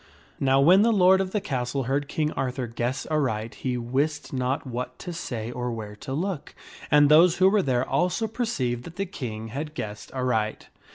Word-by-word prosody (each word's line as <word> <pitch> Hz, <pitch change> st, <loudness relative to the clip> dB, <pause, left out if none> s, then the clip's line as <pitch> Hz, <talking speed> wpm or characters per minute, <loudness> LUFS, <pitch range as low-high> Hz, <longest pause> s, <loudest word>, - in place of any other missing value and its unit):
Now 135 Hz, 0 st, +3 dB
when 175 Hz, +8 st, +6 dB
the 230 Hz, +2 st, +4 dB
lord 190 Hz, -2 st, +5 dB
of 190 Hz, -, -2 dB
the 210 Hz, -, -1 dB
castle 130 Hz, -4 st, -2 dB
heard 140 Hz, +3 st, -1 dB
King 150 Hz, +1 st, -1 dB
Arthur 130 Hz, -1 st, -2 dB
guess 120 Hz, +3 st, -3 dB
aright 115 Hz, -7 st, 0 dB
he 125 Hz, -2 st, -3 dB
wist 140 Hz, +7 st, -2 dB
not 130 Hz, +2 st, -1 dB
what 125 Hz, 0 st, -5 dB
to 175 Hz, -, -6 dB
say 120 Hz, -8 st, -4 dB
or. 125 Hz, 0 st, -3 dB
where 105 Hz, -2 st, -6 dB
to 130 Hz, -, -8 dB
look, 175 Hz, +1 st, -3 dB, 0.3 s
and 145 Hz, 0 st, +6 dB
those 165 Hz, +4 st, +6 dB
who 185 Hz, -, +5 dB
were 205 Hz, +1 st, +4 dB
there 130 Hz, -5 st, 0 dB
also 180 Hz, +6 st, +1 dB
per 235 Hz, +3 st, -2 dB
ceived 125 Hz, -, -1 dB
that 170 Hz, -, -10 dB
the 195 Hz, -, -2 dB
King 115 Hz, -, -6 dB
had 150 Hz, +6 st, -5 dB
guessed 105 Hz, -6 st, -6 dB
aright. 125 Hz, -5 st, -1 dB
135 Hz, 195 wpm, -26 LUFS, 120-170 Hz, 0.3 s, when